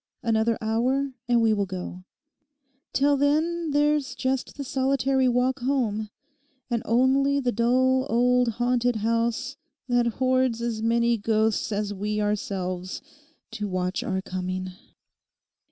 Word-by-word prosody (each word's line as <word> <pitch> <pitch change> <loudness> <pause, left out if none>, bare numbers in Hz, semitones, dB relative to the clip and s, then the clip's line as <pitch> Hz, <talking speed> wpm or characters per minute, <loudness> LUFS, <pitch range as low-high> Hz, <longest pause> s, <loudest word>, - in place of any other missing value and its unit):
Another 225 0 +1
hour, 250 +5 0 0.2
and 240 -1 +3
we 220 -1 +4
will 200 -2 0
go. 185 0 -7 0.9
Till 285 +1 +3
then 315 +4 +1
there's 295 -1 +1
just 260 0 -2
the 280 - -4
solitary 265 -1 +1
walk 250 +2 +1
home 235 -5 -1 0.6
and 235 -1 0
only 270 +4 +3
the 250 -3 0
dull 255 +3 +2
old 245 0 +3
haunted 245 +1 +1
house 230 +2 -1 0.3
that 245 -1 +2
hoards 255 -2 +2
as 235 -2 -3
many 235 0 +2
ghosts 220 +1 +1
as 205 0 -2
we 210 +2 -2
ourselves 190 -2 -3 0.5
to 210 - -4
watch 185 -1 -2
our 190 0 -2
coming. 185 0 -4
235 Hz, 125 wpm, -25 LUFS, 210-260 Hz, 0.9 s, we